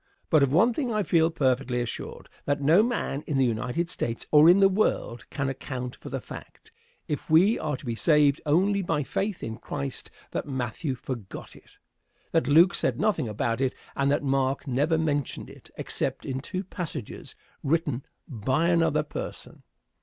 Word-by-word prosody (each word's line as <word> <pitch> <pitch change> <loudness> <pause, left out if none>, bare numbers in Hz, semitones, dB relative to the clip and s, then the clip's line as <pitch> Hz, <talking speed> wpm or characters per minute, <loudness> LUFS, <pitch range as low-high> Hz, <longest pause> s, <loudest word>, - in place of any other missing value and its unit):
But 155 -3 +5
of 140 -2 +3
one 220 - +4
thing 255 -1 -2
I 215 -1 +1
feel 165 -2 +3
perfectly 130 -5 0
assured; 120 -1 -5 0.2
that 145 0 0
no 155 +7 +5
man 220 - -1
in 145 - 0
the 135 - +4
United 125 +8 -1
States, 115 -7 -3
or 150 +2 +8
in 180 +3 +7
the 195 - +7
world, 190 - -1
can 140 -1 -2
account 130 -2 -5
for - - -10
the - - -3
fact, - - -12 0.4
if 150 - -4
we 180 +8 +5
are 150 -3 -2
to - - -13
be 120 - -2
saved 145 +2 +3
only 190 +7 +2
by 165 -5 0
faith 195 +7 -3
in 110 0 -4
Christ, 70 0 -5 0.2
that - - -3
Matthew 130 +2 -3
forgot 125 -6 -7
it, - - -19 0.5
that 165 - +2
Luke 165 +6 +6
said - - 0
nothing 195 - +1
about 115 +3 -1
it, 130 -1 0 0.2
and 140 0 +1
that 145 +1 +1
Mark 135 0 0
never 145 +5 +1
mentioned 145 -3 -2
it - - -16
except - - -3
in 130 0 -3
two 185 +7 -4
passages 170 - -7 0.3
written 145 -4 0 0.2
by 130 +8 0
another 165 -3 +2
person. 150 - -7
145 Hz, 175 wpm, -27 LUFS, 130-170 Hz, 0.5 s, or